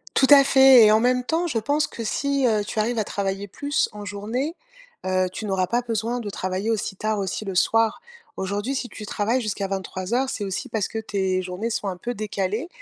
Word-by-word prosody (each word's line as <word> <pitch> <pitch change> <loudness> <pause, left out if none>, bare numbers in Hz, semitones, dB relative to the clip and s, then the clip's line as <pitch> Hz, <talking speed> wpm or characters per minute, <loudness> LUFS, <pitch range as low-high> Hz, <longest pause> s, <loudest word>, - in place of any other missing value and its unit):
Tout 265 - +5
à 280 -1 +10
fait, 265 -3 +7
et 210 - +6
en 215 - +5
même 250 +1 +2
temps, 325 +6 0
je 245 -9 0
pense 290 +6 +1
que 235 - -7
si, 275 +4 0
heu, 215 -3 +2
tu 215 - -4
arrives 230 +3 0
à 215 - +2
travailler 195 0 -3
plus 285 +9 -1
en 210 0 -9
journée, 220 - -3 0.5
heu, 185 0 +1
tu 215 - -6
n'auras 190 -3 0
pas 240 +1 +1
besoin 230 +1 -2
de 215 -4 -5
travailler 190 +4 -2
aussi 210 -2 -2
tard, 215 +1 -1
aussi 195 +2 -3
le 195 - -4
soir. 225 - +2 0.3
Aujourd'hui, 205 +7 -2
si 255 -2 -3
tu 210 - -8
travailles 225 +6 0
jusqu'à 200 -3 -2
23:00, 195 +6 -2
c'est 215 -6 -3
aussi 195 +7 -4
parce 220 -4 -1
que 225 - -4
tes 190 -3 -1
journées 185 +5 -4
sont 210 - -2
un 185 - -3
peu 240 +6 -4
décalées. 210 - -3
215 Hz, 220 wpm, -24 LUFS, 195-245 Hz, 0.5 s, à